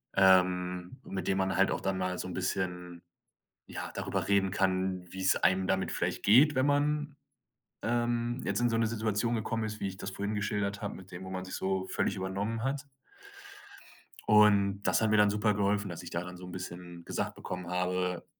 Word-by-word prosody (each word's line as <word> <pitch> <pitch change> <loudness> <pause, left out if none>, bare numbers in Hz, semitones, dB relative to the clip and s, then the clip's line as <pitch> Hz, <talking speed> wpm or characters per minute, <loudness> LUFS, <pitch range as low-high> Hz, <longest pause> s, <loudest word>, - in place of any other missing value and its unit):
ähm, 90 -1 +3
mit 95 - -5
dem 95 - +2
man 95 0 0
halt 95 - +4
auch - - -2
dann 95 -1 -1
mal 90 0 -1
so - - -4
'n 90 - -6
bisschen, 90 -1 -3 0.7
ja, - - -6
darüber - - -2
reden 100 -1 +3
kann, 95 -1 0
wie's 95 0 +2
einem 95 0 +2
damit 95 0 0
vielleicht - - -2
geht, 135 +8 +6
wenn 130 +1 +3
man, 145 +1 +1 0.7
ähm, 120 +1 0
jetzt - - 0
in 120 - +3
so 115 - +1
'ne 115 - +3
Situation 110 +1 0
gekommen 115 0 -1
ist, 110 0 -5
wie 100 - -1
ich 95 - -7
das 95 - -5
vorhin 100 +2 -3
geschildert 105 -1 -1
habe 105 - -3
mit 95 0 -12
dem, 90 +2 -7
wo 95 - -7
man 95 0 -4
sich 95 - -7
so 95 0 -1
völlig 100 - 0
übernommen 100 +4 -2
hat. 140 +1 -2 1.4
Und 100 -2 +5
das - - +2
hat 110 - +2
mir 110 - +4
dann 105 0 +6
super 105 +1 +2
geholfen, 105 0 0
dass 85 - -6
ich - - -8
da 85 +1 -3
dann 90 0 -8
so 90 - -10
'n 90 - -9
bisschen 90 -1 -8
gesagt - - -3
bekommen 90 -1 -6
habe 90 0 -1
95 Hz, 200 wpm, -30 LUFS, 90-110 Hz, 1.4 s, geht